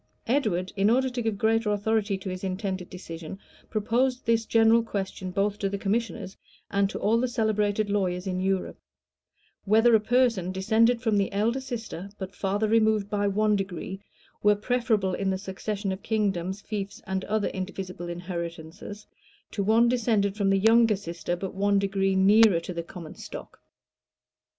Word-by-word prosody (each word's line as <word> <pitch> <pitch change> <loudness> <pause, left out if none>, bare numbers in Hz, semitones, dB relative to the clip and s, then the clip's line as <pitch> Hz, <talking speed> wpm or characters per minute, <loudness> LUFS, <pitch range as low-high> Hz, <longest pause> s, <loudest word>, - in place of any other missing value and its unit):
Edward, 210 -8 0
in 200 +1 +3
order 260 +2 +2
to 245 0 -3
give 220 -3 -1
greater 225 +1 +2
authority 205 -1 0
to 190 0 -6
his 185 +1 -6
intended 190 -1 -3
decision, 165 -1 -8 0.3
proposed 245 +4 0
this 230 -1 +1
general 225 0 +5
question 195 -4 -4
both 200 +2 -1
to 195 - 0
the 200 - -3
commissioners 205 -1 -2 0.4
and 200 0 +2
to - - -5
all 225 +3 +2
the 255 - +1
celebrated 215 -3 0
lawyers 190 -3 -1
in 185 -1 -2
Europe, 190 0 -1 0.9
"Whether 225 +3 +5
a 220 - +7
person 230 -5 +2
descended 225 +5 +2
from 220 -3 +2
the 195 - 0
elder 225 +6 0
sister, 220 -7 -6
but 190 0 -6
farther 200 +3 -1
removed 215 -2 +2
by 205 -1 +1
one 210 +1 +2
degree, 195 0 -4 0.4
were 210 0 +5
preferable, 215 -3 0
in 195 +1 -1
the 190 - 0
succession 195 +1 -4
of 190 +1 -5
kingdoms, 195 -3 -1
fiefs, 205 -2 -5
and 190 0 -2
other 215 -1 0
indivisible 185 -2 -6
inheritances, 170 +2 -6 0.5
to 205 - -2
one 220 +4 +4
descended 220 -5 +1
from 200 -2 +1
the 195 - +4
younger 225 +2 +5
sister, 175 -2 -4
but 190 +1 -5
one 200 +1 +2
degree 195 -1 +1
nearer 200 -1 +6
to 180 - -6
the 170 - -3
common 170 -1 -10
stock?" - - -10
200 Hz, 165 wpm, -27 LUFS, 190-220 Hz, 0.9 s, a